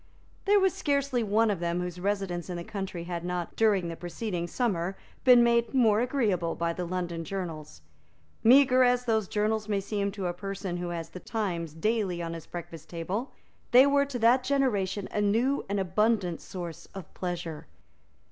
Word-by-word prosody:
There 410 0 +5
was 380 -2 +3
scarcely 280 -4 0
one 220 +1 +2
of 195 - -2
them 170 0 -1
whose 180 0 -4
residence 190 -2 -2
in 180 - -3
the 170 - -5
country 190 -3 -5
had 170 -1 -4
not, 180 -1 -3
during 205 -5 +3
the 165 - -5
preceding 175 0 -4
summer, 190 -4 -1 0.3
been 250 -2 +7
made 235 +2 +2
more 220 -5 +4
agreeable 210 -10 0
by 170 0 -1
the 180 +1 -4
London 175 -1 -3
journals. 165 -5 -6 0.6
Meagre 255 +2 +6
as 250 0 +3
those 220 -4 +1
journals 215 +1 -1
may 205 -1 +1
seem 200 0 -2
to 200 -2 -4
a 175 - -1
person 195 -1 -5
who 175 0 -4
has 165 -1 -5
the 180 - -9
Times 175 -8 -3
daily 200 0 0
on 165 -1 -4
his 165 -2 -8
breakfast 165 -2 -8
table, 185 +9 -3 0.4
they 255 +2 +8
were 280 0 +3
to 270 -3 -4
that 245 +2 +4
generation 210 -8 0
a 210 - 0
new 230 +7 +2
and 200 0 0
abundant 190 -1 +1
source 175 -3 -7
of 190 -5 -9
pleasure. 175 -4 -5
195 Hz, 180 wpm, -28 LUFS, 175-230 Hz, 0.6 s, they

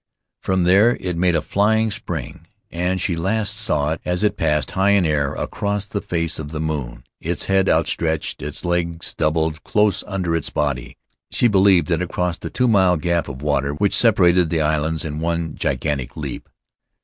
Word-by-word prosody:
From 95 -1 0
there 100 +7 +5
it 90 -2 -3
made 90 0 +2
a 80 - 0
flying 110 +5 +2
spring, 85 -9 -5 0.2
and 90 +2 -1
she 90 -1 -1
last 100 +5 -1
saw 75 -8 0
it 80 - -4
as 90 +2 -1
it 105 - +2
passed, 75 -2 0
high 95 +1 +2
in 100 -3 +3
air, 75 -3 0
across 100 0 -2
the 100 0 -4
face 85 -2 -2
of 75 -2 -6
the 75 0 -5
moon, 70 -7 -4 0.2
its 85 +2 -3
head 95 -1 +2
outstretched, 80 -2 0
its 75 +4 -5
legs 85 -1 -1
doubled 80 0 0
close 105 -2 +1
under 90 -5 -1
its 80 - -1
body. 70 -5 -2 0.3
She 120 - +2
believed 95 -4 +4
that 85 -1 +1
it 90 - -3
crossed 90 -1 -2
the - - -5
two 125 - 0
mile 95 -5 +4
gap 85 +2 0
of 65 0 -8
water 70 -1 0
which 100 +5 +1
separated 90 -6 +4
the 80 -1 0
islands 75 +1 0
in 75 0 -4
one 85 -1 -2
gigantic 70 -5 -2
leap. - - -6
85 Hz, 185 wpm, -21 LUFS, 75-95 Hz, 0.3 s, there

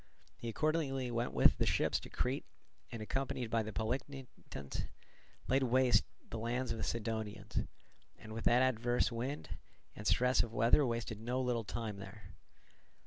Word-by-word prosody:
He 115 - -5
accordingly 135 -2 0
went 120 +1 -1
with - - +5
the - - +3
ships - - +2
to - - -10
Crete, - - -1 0.4
and, 115 -2 -5
accompanied 130 -1 -2
by 115 - +3
the 110 0 -4
Polichnitans, 125 - -4 0.6
laid 135 +2 +3
waste 125 -3 +4 0.2
the 115 - -5
lands 120 +3 -1
of 115 - -3
the - - -2
Cydonians; 110 -2 -2 0.6
and, 110 - -11
what - - -5
with - - +6
adverse 120 -1 +3
winds 125 +5 -3 0.5
and 105 - -5
stress 125 0 +4
of 115 -1 -3
weather 115 +7 +5
wasted 115 -2 -2
no 120 +3 -1
little 125 -3 0
time 110 -1 -4
there. 100 0 -10
120 Hz, 155 wpm, -35 LUFS, 110-130 Hz, 0.6 s, with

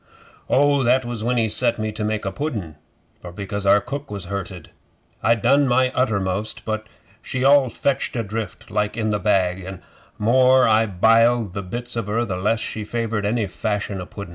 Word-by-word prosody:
'Oh, 145 0 +3
that 130 +1 +2
was 120 -2 -5
when 125 +1 0
he 115 -1 +2
set 115 +2 +1
me 110 -1 -2
to 110 0 -5
make 105 0 -2
a 95 - -1
pudden, 105 - -4 0.5
for 90 - -9
because 100 +2 -5
our 100 - +6
cook 140 +5 -6
was 100 -3 -6
hurted. 95 -2 -6 0.5
I 115 - +4
done 135 +5 +3
my 130 +1 +2
uttermost, 105 -4 -1
but 110 0 -3 0.3
she 130 +1 -3
all 140 -1 +5
fetched 135 +2 -1
adrift 110 -3 -5
like 105 +1 -1
in 110 -1 0
the 105 - 0
bag, 95 -3 +1
an' 95 +1 -6
the - - -17 0.4
more 130 +3 +5
I 110 0 +3
biled 115 +2 +3
the 100 - -3
bits 120 +7 -6
of 115 -3 -3
her, 115 +3 0
the 95 -4 -3
less 105 +4 +1
she 110 0 -4
favoured 110 -2 -2
any 110 0 0
fashion 100 0 -3
o' 90 - -8
pudden. 100 -3 -8
110 Hz, 195 wpm, -22 LUFS, 100-120 Hz, 0.5 s, our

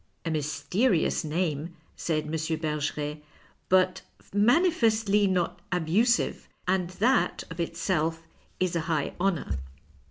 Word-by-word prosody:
A 165 - -1
mysterious 155 - +1
name," 160 0 -2 0.2
said 155 -2 -1
M. 150 - -7
Bergeret, 150 -2 -2 0.2
" - - -33
but 185 0 +3 0.3
manifestly 220 - +3
not 180 -1 0
abusive, 185 +8 +1 0.2
and 180 -1 +1
that 225 +8 +1
of 165 - -8
itself 165 -1 -1 0.4
is 185 -2 0
a - - +2
high 155 -4 0
honour. 165 - 0
170 Hz, 115 wpm, -27 LUFS, 155-195 Hz, 0.4 s, but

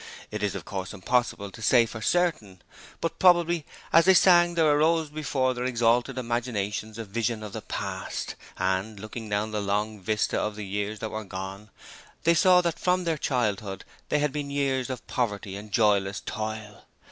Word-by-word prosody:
It 105 -1 -4
is 105 -2 -1
of - - -6
course 95 0 -5
impossible 100 -1 0
to 115 - -12
say 120 +1 +5
for 110 -1 -8
certain, 135 - 0 0.4
but 165 - -2
probably 175 -3 +4 0.3
as 165 +1 +7
they 190 0 +7
sang 175 -1 +6
there 165 -1 +3
arose 155 +1 +3
before 140 -4 0
their 125 0 -3
exalted 120 +1 +2
imaginations, 115 -3 -2
a 115 - -5
vision 110 +2 -2
of 105 -1 -7
the 110 - -5
Past, - - -4 0.2
and 95 +3 -1
looking 110 +1 -7
down 105 +1 -1
the 105 -1 -1
long 105 +2 -1
vista 105 +3 0
of 105 -1 -2
the 105 -1 -6
years 105 +2 -3
that 110 - -3
were 110 0 -4
gone, 95 +2 -7 0.5
they 165 +1 +5
saw 180 +2 +6
that 170 -2 -2
from 180 0 +1
their 165 -3 -1
childhood 105 - -1 0.2
they - - +2
had 150 -1 +1
been 145 0 -4
years 135 -2 0
of 130 - -5
poverty 105 -5 -2
and 105 +1 -9
joyless 100 -3 +2
toil. 110 -1 -6
115 Hz, 180 wpm, -27 LUFS, 105-145 Hz, 0.5 s, as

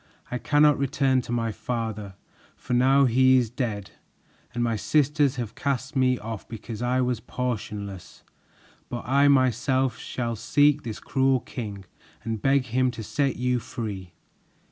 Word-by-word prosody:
I 125 - -2
cannot 150 0 +4
return 135 -1 +2
to 120 - -8
my 115 -1 0
father, 110 -3 -4 0.4
for - - -5
now 135 +3 +5
he 130 +1 +5
is 120 -3 +1
dead, 110 -6 -3 0.6
and 120 -1 -2
my 115 -1 +1
sisters 145 +4 +2
have 120 -4 -4
cast 135 +1 -2
me 130 -1 +3
off 110 -2 -7
because 115 0 -7
I 125 +1 +1
was 125 -2 0
portionless; 105 -6 -5 0.7
but 120 - -5
I 140 +2 +4
myself 130 -1 +2
shall 120 -2 -3
seek 145 +6 +3
this 115 -5 -6
cruel 130 -1 +1
king 100 -7 -7 0.4
and 110 -2 -3
beg 135 -1 +3
him 130 +1 +1
to 115 -2 -6
set 140 +4 0
you 125 0 0
free." 100 -7 -6
125 Hz, 150 wpm, -25 LUFS, 115-135 Hz, 0.7 s, now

